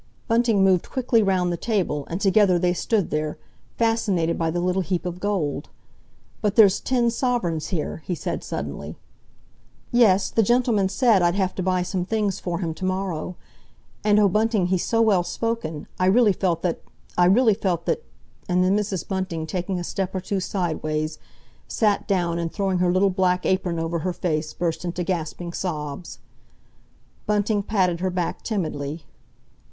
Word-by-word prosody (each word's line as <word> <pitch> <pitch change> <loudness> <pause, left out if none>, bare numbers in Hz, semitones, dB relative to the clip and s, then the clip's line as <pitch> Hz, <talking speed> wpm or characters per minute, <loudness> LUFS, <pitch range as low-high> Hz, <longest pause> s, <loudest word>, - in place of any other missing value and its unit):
Bunting 230 -3 +3
moved 185 -2 +3
quickly 245 -3 +2
round 185 -3 +1
the - - -3
table, 175 -11 -1
and 170 - -3
together 195 -2 +4
they 175 0 +2
stood 200 +1 0
there, 155 0 -2 0.4
fascinated 205 -8 +1
by 165 -1 0
the 175 +2 -1
little 180 +2 +1
heap 180 0 -2
of 180 0 -4
gold. 175 -9 -2 0.7
"But 210 -1 0
there's 205 -4 +6
ten 240 -2 +1
sovereigns 230 - -1
here," 165 -5 -3
he 160 +3 -4
said - - -4
suddenly. - - -5 0.9
"Yes, 210 -5 +4
the 225 - +3
gentleman 225 -3 +2
said 220 -1 +3
I'd 175 +1 +2
have 190 -2 0
to - - -4
buy 185 -1 +1
some 180 0 -2
things 205 0 -1
for 175 -2 -3
him 165 -3 -2
to 175 - -10
morrow. 185 -2 -2 0.7
And, 210 0 +4
oh, 205 - +5
Bunting, 215 0 +2
he's 185 -2 +1
so 230 0 +2
well 205 -5 +4
spoken, 225 -5 -3
I 185 - +3
really 210 +1 +5
felt 175 -4 -1
that—I 175 0 -2
really 220 +5 +5
felt 185 -5 -1
that—" 465 - -1 0.5
and 180 0 +3
then 185 +2 +3
Mrs. 205 -3 -2
Bunting, 185 -4 -2
taking 180 +2 -3
a - - -4
step 190 +2 -3
or - - 0
two 195 +2 -2
sideways, 155 -5 -2 0.5
sat 210 -3 +1
down, 175 -3 0
and 165 -1 -2
throwing 195 -3 -1
her 180 -1 +3
little 190 +2 +3
black 180 -1 +1
apron 185 -2 0
over 165 +1 -2
her 180 +3 -2
face 160 -3 -2
burst 170 -1 -2
into 175 0 -3
gasping 170 -1 -3
sobs. 150 -3 -4 1.1
Bunting 210 0 +1
patted 185 -5 +1
her 185 +1 0
back 180 -1 -2
timidly. 155 -7 -3
185 Hz, 170 wpm, -24 LUFS, 170-205 Hz, 1.1 s, there's